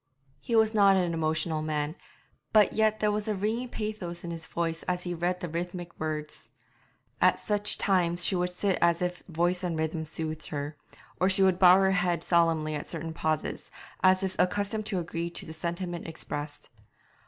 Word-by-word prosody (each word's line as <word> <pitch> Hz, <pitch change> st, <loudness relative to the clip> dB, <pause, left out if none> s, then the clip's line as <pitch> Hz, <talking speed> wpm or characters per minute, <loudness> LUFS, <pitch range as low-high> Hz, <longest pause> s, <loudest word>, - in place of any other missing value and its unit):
He 235 Hz, -, -2 dB
was 220 Hz, 0 st, +4 dB
not 200 Hz, -2 st, +5 dB
an 175 Hz, -2 st, +1 dB
emotional 160 Hz, 0 st, 0 dB
man, 155 Hz, 0 st, -2 dB, 0.6 s
but 215 Hz, -1 st, +5 dB
yet 215 Hz, 0 st, +2 dB
there 210 Hz, -1 st, +2 dB
was 210 Hz, 0 st, -2 dB
a 215 Hz, -, 0 dB
ringing 220 Hz, +5 st, -2 dB
pathos 210 Hz, -7 st, -5 dB
in 170 Hz, -, -5 dB
his 165 Hz, -1 st, -5 dB
voice 165 Hz, -1 st, -2 dB
as 180 Hz, 0 st, -1 dB
he 175 Hz, -, -3 dB
read 175 Hz, +2 st, -1 dB
the 180 Hz, -, -4 dB
rhythmic 175 Hz, +1 st, -5 dB
words. 155 Hz, -1 st, -4 dB, 0.7 s
At -, -, +4 dB
such 210 Hz, 0 st, 0 dB
times 175 Hz, -3 st, +2 dB
she 190 Hz, -, +1 dB
would 180 Hz, 0 st, 0 dB
sit 185 Hz, +1 st, -1 dB
as 170 Hz, 0 st, +3 dB
if 180 Hz, 0 st, -2 dB
voice 175 Hz, +1 st, 0 dB
and 170 Hz, -3 st, -1 dB
rhythm 160 Hz, 0 st, -2 dB
soothed 155 Hz, 0 st, -5 dB
her, 145 Hz, +1 st, -4 dB, 0.4 s
or 185 Hz, -, +3 dB
she 190 Hz, 0 st, +4 dB
would 185 Hz, -1 st, +3 dB
bow 180 Hz, -1 st, +8 dB
her 190 Hz, 0 st, +4 dB
head 180 Hz, -2 st, +1 dB
solemnly 165 Hz, -3 st, +2 dB
at 150 Hz, -, -4 dB
certain 165 Hz, -1 st, -4 dB
pauses, 155 Hz, -1 st, -2 dB, 0.3 s
as 185 Hz, 0 st, +4 dB
if 190 Hz, -1 st, -2 dB
accustomed 205 Hz, +3 st, 0 dB
to 195 Hz, -, -1 dB
agree 170 Hz, 0 st, -3 dB
to 170 Hz, -, -5 dB
the 160 Hz, -, -8 dB
sentiment 175 Hz, +1 st, -4 dB
expressed. 145 Hz, -2 st, -6 dB
175 Hz, 190 wpm, -28 LUFS, 160-190 Hz, 0.7 s, bow